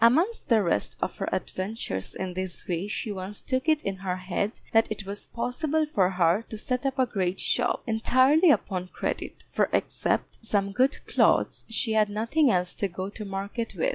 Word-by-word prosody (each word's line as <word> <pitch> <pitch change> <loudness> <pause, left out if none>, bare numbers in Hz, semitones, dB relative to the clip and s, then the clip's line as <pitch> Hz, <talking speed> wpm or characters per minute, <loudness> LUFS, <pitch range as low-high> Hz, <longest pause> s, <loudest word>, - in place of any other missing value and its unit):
Amongst 320 - +4
the 225 -3 +5
rest 165 - 0
of - - -3
her - - -2
adventures 185 - -3
in 185 -1 -4
this 185 -1 -4
way 175 +2 -1
she 210 +1 -3
once 195 +1 -5
took 260 +4 -1
it 310 -1 +3
in 195 -1 -2
her 185 -1 -2
head 185 +4 -2
that 225 -1 +4
it 215 -2 -3
was 200 +1 -4
possible 280 +6 -1
for 195 -12 +2
her 180 +2 +2
to 220 - -6
set 250 +4 -1
up 270 0 -2
a 260 - +4
great 190 -6 -1
shop, 245 0 +1
entirely 255 +8 +4
upon 185 -10 +1
credit, - - -4
for - - +1
except - - -1
some 200 -3 +1
good 260 +7 +1
clothes - - +2
she 225 0 0
had 215 -1 +3
nothing 230 +8 +2
else 180 -3 +1
to 200 - 0
go 185 +1 -5
to 215 - -7
market 200 +4 -4
with. - - +1
210 Hz, 195 wpm, -27 LUFS, 190-250 Hz, -, the